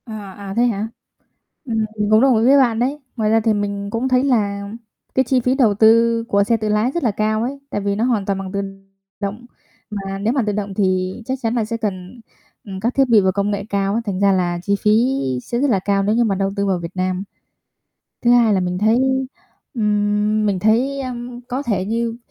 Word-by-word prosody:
À, 215 -4 -8
à, 200 -1 -7
thế 240 - +4
hả? 220 -2 -1 0.8
Ừm, 225 -3 -1
mình 210 0 0
cũng 215 +1 +6
đồng 265 -2 +4
ý 225 - +2
với 275 +3 +6
bạn 240 -5 +3
đấy. 270 +5 -1 0.2
Ngoài 220 -3 0
ra 225 +1 +4
thì 220 0 +1
mình 200 -1 -3
cũng 230 +4 -1
thấy 255 0 +2
là 200 -6 0 0.5
cái 260 - +3
chi 260 +1 +2
phí 250 +2 +1
đầu 240 -7 +3
tư 230 +2 +4
của 200 -2 +3
xe 230 +3 +1
tự 215 -1 -3
lái 210 +4 +1
rất 345 - -2
là 230 - +2
cao 215 +2 0
ấy, 275 +3 -4
tại 205 - -3
vì 200 0 -1
nó 215 - -1
hoàn 235 -5 +1
toàn 195 -1 -1
bằng 190 -1 -6
tự 200 0 -2 0.6
động, 205 +4 -5 0.4
mà 195 -2 -5
nếu 215 +4 0
mà 270 - +1
tự 210 - 0
động 200 -1 -3
thì 185 -2 0
chắc 260 +2 -2
chắn 225 0 -1
là 230 -3 0
sẽ 230 +1 -3
cần, 205 +1 -5 0.4
ừm, 190 -2 -7
các 235 +5 -1
thiết 270 -1 +3
bị 225 -2 +6
và 190 -1 +2
công 200 +2 -1
nghệ 200 -1 -3
cao 200 0 0
á, 230 - 0
thành 195 -3 -3
ra 200 0 +4
là 175 -2 0
chi 200 +1 +1
phí 210 - +2 0.5
sẽ 240 - -3
rất 285 +2 +2
là 205 -5 +2
cao 195 +1 0
nếu 210 +2 +1
như 240 - +3
mà 205 -4 +1
đầu 195 0 -1
tư 200 -1 0
vào 190 -2 +1
Việt 170 +2 -8
Nam. 185 0 -1 1.0
Thứ 240 - +3
2 240 -3 +5
là 190 - +1
mình 180 0 -2
thấy, 220 +4 +3 0.8
ừm, 210 -1 +1
mình 200 -2 0
thấy, 240 +8 +1
ờm, 245 -1 -6
có 260 +3 -2
thể 205 -8 -1
như 230 +2 -2
215 Hz, 240 wpm, -19 LUFS, 200-235 Hz, 1.0 s, cũng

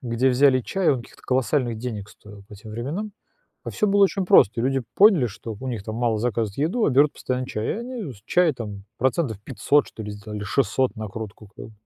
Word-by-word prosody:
где 125 +1 +1
взяли 130 0 +4
чай, 190 +7 0
он 130 -4 0
каких-то - - -18
колоссальных 130 -2 0
денег 110 -4 -5
стоил 105 -1 -14
по - - -11
тем 105 +2 -12
временам, 150 - -4 0.5
а - - -4
всё 210 - 0
было 200 0 +4
очень 195 0 0
просто, 120 - +5
люди 135 +1 +1
поняли, 195 - +6
что 110 0 -7
у 130 - -5
них 115 -5 -4
там 110 +1 -5
мало 115 -2 +1
заказывают 110 -3 -1
еду, 175 - +1
а - - +2
берут 140 +3 +4
постоянно 130 0 -3
чай 110 -3 -3
и - - +1
они 235 - -5
с 100 - -19
чая 175 +1 +3
там 105 -5 -7
процентов 125 - 0
500 140 +3 +1
что 110 - -9
ли 105 - -6
сделали, 105 0 -7
600 130 +3 0
накрутку 110 0 -7
как - - -8
бы. 110 - -14
125 Hz, 220 wpm, -24 LUFS, 110-145 Hz, 0.5 s, поняли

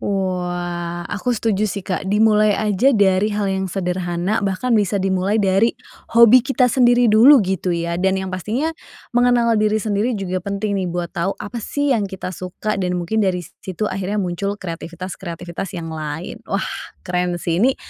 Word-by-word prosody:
Wah. 175 -3 -3
Aku 205 +5 -4
setuju 215 -1 0
sih 200 0 -5
Kak. 190 0 -3
Dimulai 210 0 +4
aja 210 +4 +2
dari 195 0 +3
hal 200 -2 0
yang 190 0 -2
sederhana 180 +1 -1
bahkan 200 +5 -1
bisa 205 -2 +2
dimulai 190 +2 0
dari 200 +2 +2 0.4
hobi 235 +2 +8
kita 255 -1 +1
sendiri 245 -1 +4
dulu 245 +7 +8
gitu 190 0 -2
ya 170 0 -2
dan 190 +1 +2
yang 190 -1 -4
pastinya 230 - -2 0.4
mengenal 240 -1 +3
diri 215 0 +2
sendiri 215 +2 0
juga 185 -2 -3
penting 200 +2 -2
nih 185 - -2
buat 175 0 -4
tahu 175 +3 -2
apa 235 +3 -6
sih 285 +5 0
yang 210 -5 0
kita 185 -1 -6
suka 185 +4 -4
dan 180 -1 -1
mungkin 195 +6 -1
dari 180 -3 0 0.2
situ 190 +3 -4
akhirnya 195 +2 -3
muncul 200 +1 -2
kreatifitas-kreatifitas 175 0 -6
yang 165 -1 -5
lain. 155 +7 -5
Wah! 195 -1 -1 0.4
Keren 180 -1 -1
sih. 170 +1 -1
Ini 260 +3 +3
195 Hz, 170 wpm, -20 LUFS, 180-215 Hz, 0.4 s, hobi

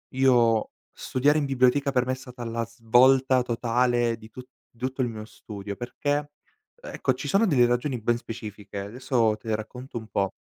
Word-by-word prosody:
Io 120 -4 +3 0.2
studiare 145 +4 +1
in 145 - +1
biblioteca 135 +1 +2
per 125 -2 +1
me 130 - +1
è - - -2
stata 125 -1 -10
la 115 0 -2
svolta 125 +3 +4
totale 120 0 +1
di 110 0 -15
tu 130 - -9 0.3
di 120 - -29
tutto 130 +1 -2
il - - 0
mio 110 -2 -6
studio 100 -2 -8
perché, 145 +5 -2 0.4
ecco, 485 - -2
ci 130 +3 -6
sono 200 +9 +3
delle 125 - +4
ragioni 125 +1 -1
ben 120 +2 +1
specifiche, 105 -3 -8
adesso 115 +1 0
te 115 - -15
le 110 - +2
racconto 125 +4 -7
un 110 - -12
po'. 100 -2 -1
120 Hz, 185 wpm, -26 LUFS, 115-130 Hz, 0.4 s, svolta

